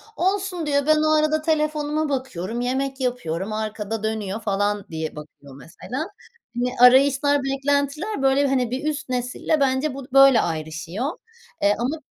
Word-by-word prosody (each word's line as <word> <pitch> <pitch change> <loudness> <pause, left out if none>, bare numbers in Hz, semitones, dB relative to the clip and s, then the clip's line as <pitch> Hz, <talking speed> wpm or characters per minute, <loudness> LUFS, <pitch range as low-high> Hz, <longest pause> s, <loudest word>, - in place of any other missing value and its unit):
"Olsun," 380 -2 -1
diyor, 285 -1 +1
"ben 310 - +6
o 310 0 +3
arada 310 0 +1
telefonuma 305 -1 0
bakıyorum, 240 -5 -3
yemek 265 +2 -2
yapıyorum, 215 -6 -2
arkada 215 0 -4
dönüyor." 215 -1 -2
falan 205 -1 -1
diye 160 -1 -4
bakıyor 145 -2 -12
mesela. 250 - -6 0.5
Hani, 250 +1 -1 0.2
arayışlar, 280 +2 +3
beklentiler, 285 +7 -1
böyle, 270 +1 +3
hani 255 -3 0
bir 260 +3 -3
üst 300 -2 -5
nesille 250 +5 -1
bence 270 +1 +1
bu 270 -1 -8
böyle 270 -3 +7
ayrışıyor. 160 +6 -4 0.6
Eee, 205 +1 +3
ama 260 +7 -1
265 Hz, 145 wpm, -23 LUFS, 215-290 Hz, 0.6 s, böyle